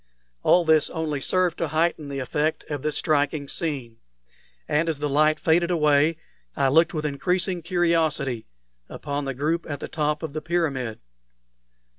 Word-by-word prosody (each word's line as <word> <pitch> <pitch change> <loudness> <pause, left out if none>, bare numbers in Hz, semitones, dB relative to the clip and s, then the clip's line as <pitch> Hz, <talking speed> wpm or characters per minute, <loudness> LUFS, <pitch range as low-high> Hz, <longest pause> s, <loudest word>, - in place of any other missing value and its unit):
All 175 -1 +4
this 160 -2 +4
only 155 -3 -3
served 180 +2 +1
to 165 - 0
heighten 160 -1 0
the 140 - -4
effect 150 +4 -1
of 145 -2 -3
this 150 +1 -1
striking 145 -1 0
scene; 135 -8 -3 0.7
and 165 +3 +1
as 160 - -1
the 150 +1 -2
light 155 +2 +3
faded 170 +2 +2
away, 150 -1 +3 0.4
I 135 -1 +2
looked 165 +5 +3
with 155 0 -2
increasing 180 +5 0
curiosity 160 - 0 0.4
upon 145 -1 -4
the 135 -1 -3
group 160 +5 -1
at 145 -2 -4
the - - -5
top 150 0 -1
of 155 -3 -5
the 155 - -4
pyramid. 145 -9 -2
155 Hz, 160 wpm, -24 LUFS, 145-165 Hz, 0.7 s, All